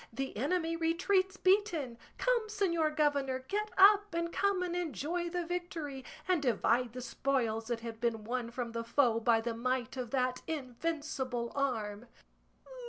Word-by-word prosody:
The 270 +4 -4
enemy 325 - 0
retreats 370 +4 +1
beaten! 360 - +2 0.2
Come, 485 -3 +1
señor 340 -7 +1
governor, 285 -3 +2
get 420 +1 -1
up, 405 -1 +6
and 335 0 -1
come 400 -2 +1
and 350 -1 -2
enjoy 345 - -2
the 350 0 -2
victory, 330 -6 -4 0.2
and 365 -4 +2
divide 240 -1 +2
the 250 - -5
spoils 235 -4 -1
that 235 -1 -2
have 225 -1 -7
been 230 -2 0
won 240 +1 -2
from 240 -1 -4
the 230 0 -3
foe 235 -1 +3
by 230 0 +3
the 235 0 -2
might 250 +2 -2
of 250 -2 -3
that 255 0 0
invincible 265 -4 -3
arm." 230 -5 -2
275 Hz, 155 wpm, -32 LUFS, 235-345 Hz, 0.2 s, up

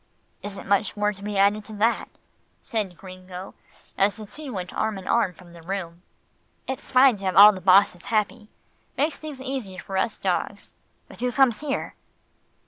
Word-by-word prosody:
"Isn't 200 -1 -7
much 200 +2 +1
more 210 0 +1
to 195 - -15
be 205 0 -4
added 200 +2 +3
to 220 - -10
that," 220 +3 +1 0.5
said 205 -6 -3
Gringo, 185 0 -10 0.5
as 200 +1 +3
the 215 -1 -9
two 290 +6 -9
went 185 -4 -5
arm 220 -2 -1
in 190 - -9
arm 235 -6 +2
from 175 -1 -17
the 170 - -13
room. 175 -1 -5 0.7
"It's 265 +1 -5
fine 255 -3 +6
to 195 - -7
have 185 - 0
all 205 +3 +10
the 190 -2 -8
bosses 185 -1 +4
happy. 215 -1 -1 0.5
Makes 295 +2 +1
things 300 -4 -8
easier 260 -8 -5
for 190 +1 -5
us 210 - 0
dogs 190 +2 -2 0.3
but - - -14
who 250 0 0
comes 255 -4 +3
here?" 295 -2 -3
205 Hz, 180 wpm, -25 LUFS, 190-230 Hz, 0.7 s, all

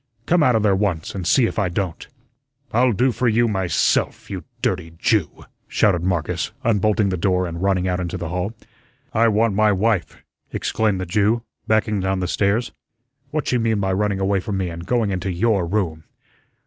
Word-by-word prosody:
Come 175 0 +3
outa 125 -6 +4
there 105 -2 +3
once, 95 -5 -1
an' 95 -3 -5
see 125 +6 +4
if 115 - -2
I 100 -3 +1
don't." 85 -1 -3 0.6
"I'll 125 +2 +3
do 125 +5 +2
for 125 +1 -1
you 115 +1 +3
myself, 95 -4 0
you - - -5 0.2
dirty 85 -3 -1
Jew," 100 -3 0 0.2
shouted 90 -5 +2
Marcus, 90 -4 -1
unbolting 105 -2 +2
the 90 - -1
door 90 +1 +1
and 85 0 -5
running 95 -1 +1
out 90 0 0
into 90 -2 -3
the 85 - -5
hall. 90 +4 -2 0.6
"I 115 +1 +4
want 110 0 +2
my 105 +1 +3
wife," 100 -2 0 0.3
exclaimed 105 -4 0
the 95 - -3
Jew, 105 +5 +1 0.2
backing 110 -1 +2
down 95 0 -1
the 90 - -1
stairs. 105 +6 0 0.6
"What's 150 0 -2
she 125 - +2
mean 115 -2 +1
by 95 -1 0
running 100 0 0
away 95 0 +1
from 100 +1 -3
me 95 -2 -2
and 85 +1 -8
going 115 -4 +1
into 95 0 -2
your 95 -1 +1
room?" 85 -5 -2
100 Hz, 185 wpm, -21 LUFS, 90-110 Hz, 0.6 s, outa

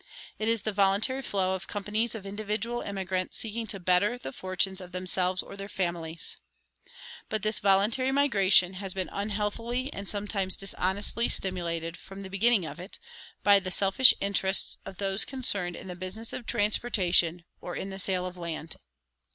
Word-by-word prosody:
It 215 - -1
is 230 -3 +1
the 215 - -1
voluntary 200 +7 +2
flow 190 -6 0
of 190 -1 -4
companies 210 +3 -2
of 205 -3 -7
individual 215 +4 -3
emigrants 190 -2 -2
seeking 225 +1 -3
to 195 - -5
better 185 +6 +2
the 135 - -7
fortunes 190 +1 -1
of 180 0 -11
themselves 185 0 0
or - - -10
their 200 0 -7
families. 170 -4 -3 0.9
But 215 -2 -2
this 215 0 +1
voluntary 205 +7 +3
migration 200 -10 +4
has 190 0 -5
been 185 -1 -2
unhealthily 215 +6 -2
and 200 -2 -5
sometimes 200 -2 -1
dishonestly 195 +4 0
stimulated, 170 -3 -2
from 195 +1 -10
the 190 - -9
beginning 205 -1 +3
of 165 - -7
it, 180 +3 -9 0.5
by 200 -1 +7
the 185 -1 -5
selfish 195 +7 +6
interests 195 -1 +1
of 190 - -9
those 195 +1 +3
concerned 200 -10 0
in - - -9
the 180 - -6
business 185 +6 -4
of 240 - -6
transportation 190 -6 +2 0.2
or 175 - -6
in 195 - -4
the 190 - -5
sale 185 -1 +2
of 180 0 -6
land. 165 -2 -5
195 Hz, 165 wpm, -28 LUFS, 185-215 Hz, 0.9 s, by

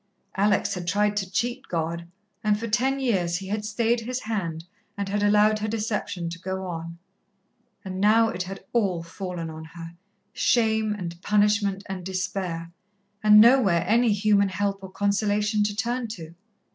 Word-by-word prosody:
Alex 205 +1 +2
had 175 -2 -5
tried 205 +2 +2
to 195 -3 -2
cheat 240 +5 -2
God, 170 0 -3 0.4
and 210 -1 +2
for 230 - -4
ten 260 +6 +1
years 185 -10 +1
He 190 +1 -7
had 210 +1 -2
stayed 230 +2 +1
His 250 +2 -4
hand 170 -7 -3 0.3
and 200 -1 -2
had 205 +1 -1
allowed 210 +1 +4
her 215 - -2
deception 210 -5 -2
to 170 - -7
go 190 +1 -4
on. 170 -1 -6 0.9
And 190 0 -4
now 225 +2 +5
it 180 - -4
had 190 +1 -6
all 195 -8 +1
fallen 170 -1 -6
on 160 0 -8
her 165 0 -8 0.4
shame 220 -3 +2
and 175 -4 -5
punishment 205 -1 +2
and 190 -1 -5
despair, 185 -2 -3 0.5
and 210 0 +7
nowhere 215 -8 +5
any 230 +2 +4
human 205 -1 +3
help 195 +2 -1
or 190 - -8
consolation 205 +2 +1
to 205 -1 -2
turn 240 +2 -1
to. 170 -7 -8
205 Hz, 165 wpm, -25 LUFS, 180-215 Hz, 0.9 s, and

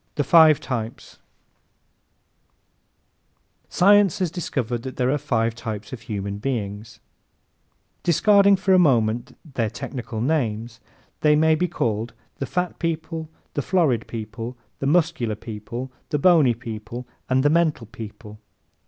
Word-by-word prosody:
The 145 - +1
Five 160 -1 +6
Types 115 -3 -5 2.5
¶ - - -36
Science 200 -1 +5
has 180 -4 -1
discovered 125 -9 -3
that 130 +1 -7
there 125 0 +1
are 145 - +2
five 115 -5 0
types 110 -1 -6
of 120 - -7
human 100 -4 -4
beings. 105 -3 -4 1.0
Discarding 200 +3 +5
for 190 0 +1
a 185 - +6
moment 120 -7 +2 0.2
their 115 -4 0
technical 125 -2 -6
names, 115 -4 -1 0.4
they 150 -1 +4
may 160 +1 +4
be 175 +3 +1
called 115 -5 -2 0.3
the 135 - -3
fat 180 -1 -2
people, 160 -1 -3 0.2
the 145 - -1
florid 145 - +1
people, 115 +2 -6 0.2
the 135 - -1
muscular 155 -8 +1
people, 115 +4 -7 0.2
the 150 - 0
bony 150 -6 +5
people 115 +1 -7 0.2
and 130 0 +3
the 145 - +4
mental 160 -7 +2
people. 105 -1 -10
130 Hz, 135 wpm, -23 LUFS, 115-160 Hz, 2.5 s, Five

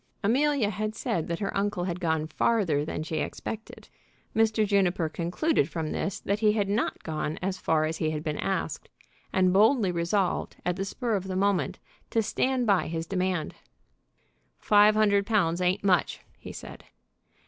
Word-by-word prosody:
Amelia 260 0 +2
had 215 +2 -3
said 165 -6 -2
that 170 - -2
her 195 - -3
uncle 200 -2 0
had 175 -1 -3
gone 160 -3 0
farther 165 -3 +1
than 155 0 -4
she 160 0 -4
expected. 220 0 -5 0.5
Mr. 220 -1 +3
Juniper 190 -4 +2
concluded 175 - 0
from 160 -1 -3
this 195 - -2
that 200 +1 -1
he 210 -1 +4
had 205 -2 0
not 205 +3 -1
gone 155 -1 -3
as 190 0 -3
far 155 -1 +1
as 160 +1 -2
he 155 - 0
had 155 -1 -3
been 150 -2 -3
asked, 195 -1 -2 0.4
and 185 -1 +3
boldly 215 0 +4
resolved, 175 +2 -1
at 180 0 0
the 195 +1 -3
spur 235 +3 -2
of 195 -2 -1
the 185 - -3
moment, 195 -1 +1 0.3
to 225 - +1
stand 255 +3 0
by 195 -7 +2
his 165 0 -3
demand. 185 -2 -1 1.0
"Five 210 0 +5
hundred 205 -2 +3
pounds 180 -6 +1
ain't 180 +3 +1
much," 185 -3 +2 0.2
he - - -9
said. - - -10
190 Hz, 170 wpm, -27 LUFS, 170-210 Hz, 1.0 s, Five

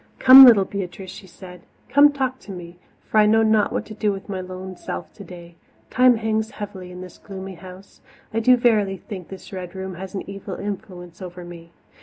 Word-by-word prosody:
"Come, 265 +1 +10
little 215 -6 +6
Beatrice," 190 -1 -7
she 190 - -12
said, 180 0 -13 0.3
"come 290 +1 +5
talk 260 -2 -3
to 205 - -12
me, 175 -1 -10 0.3
for 215 - +1
I 210 - +5
know 225 +1 +4
not 215 -1 +2
what - - -3
to 215 - -10
do 210 -1 -1
with 195 0 -7
my 190 -2 -4
lone 185 0 -8
self - - -7
today. 175 -3 -12 0.4
Time 255 -1 +4
hangs 220 0 -2
heavily 190 -4 -9
in 180 0 -10
this 185 -1 -12
gloomy 190 -1 -9
house. 185 +2 -14 0.3
I 225 - 0
do 250 +2 +4
verily 210 -5 +1
think 185 -2 -9
this 190 +1 -12
Red 180 -1 -7
Room 190 0 -6
has 190 +2 -9
an 195 - -6
evil 195 -1 -7
influence 185 -3 -8
over 180 -1 -9
me. 170 -1 -12
195 Hz, 205 wpm, -22 LUFS, 180-215 Hz, 0.4 s, Come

